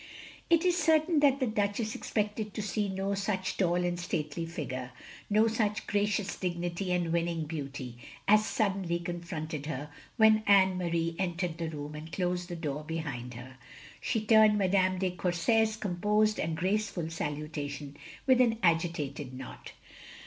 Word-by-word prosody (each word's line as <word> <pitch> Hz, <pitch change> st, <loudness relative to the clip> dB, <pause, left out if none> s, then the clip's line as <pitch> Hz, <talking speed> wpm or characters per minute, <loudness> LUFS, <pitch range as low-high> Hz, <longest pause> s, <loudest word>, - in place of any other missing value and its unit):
It 335 Hz, 0 st, +4 dB
is 355 Hz, -1 st, +4 dB
certain 320 Hz, -1 st, +3 dB
that 280 Hz, -2 st, +4 dB
the 260 Hz, -, +2 dB
Duchess 215 Hz, 0 st, -1 dB
expected 210 Hz, -3 st, -2 dB
to -, -, -2 dB
see 210 Hz, 0 st, -1 dB
no 195 Hz, +1 st, -1 dB
such 195 Hz, -1 st, -1 dB
tall 175 Hz, -3 st, +2 dB
and 175 Hz, 0 st, 0 dB
stately 165 Hz, -1 st, -3 dB
figure, 130 Hz, -6 st, -5 dB, 0.4 s
no 215 Hz, +2 st, +4 dB
such 215 Hz, -1 st, 0 dB
gracious 205 Hz, -1 st, 0 dB
dignity 175 Hz, +1 st, -2 dB
and 175 Hz, -2 st, 0 dB
winning 170 Hz, -1 st, 0 dB
beauty, 140 Hz, -6 st, -6 dB, 0.3 s
as 215 Hz, +1 st, +6 dB
suddenly 195 Hz, -5 st, 0 dB
con 175 Hz, 0 st, -4 dB
fronted 155 Hz, -3 st, -5 dB
her 150 Hz, -1 st, -4 dB, 0.3 s
when 220 Hz, -1 st, +6 dB
Anne 190 Hz, -2 st, +6 dB
Marie 170 Hz, -1 st, -1 dB
entered 175 Hz, -2 st, -2 dB
the 165 Hz, -1 st, -2 dB
room 150 Hz, -1 st, -6 dB
and 155 Hz, +2 st, -8 dB
closed 180 Hz, 0 st, -1 dB
the 175 Hz, -, -4 dB
door 150 Hz, -3 st, -3 dB
behind 145 Hz, -7 st, -5 dB
her. 130 Hz, +2 st, -10 dB, 0.4 s
She 250 Hz, -, 0 dB
returned 215 Hz, -1 st, +6 dB
Madame 185 Hz, -1 st, +2 dB
de 185 Hz, 0 st, 0 dB
Courset's 190 Hz, +5 st, +1 dB
composed 210 Hz, +2 st, +1 dB
and 160 Hz, 0 st, -1 dB
graceful 190 Hz, -3 st, -1 dB
salutation 145 Hz, -2 st, -4 dB, 0.3 s
with 255 Hz, -1 st, +5 dB
an 230 Hz, -2 st, +3 dB
agitated 160 Hz, -6 st, 0 dB
nod. 130 Hz, 0 st, -9 dB
180 Hz, 155 wpm, -30 LUFS, 160-210 Hz, 0.4 s, as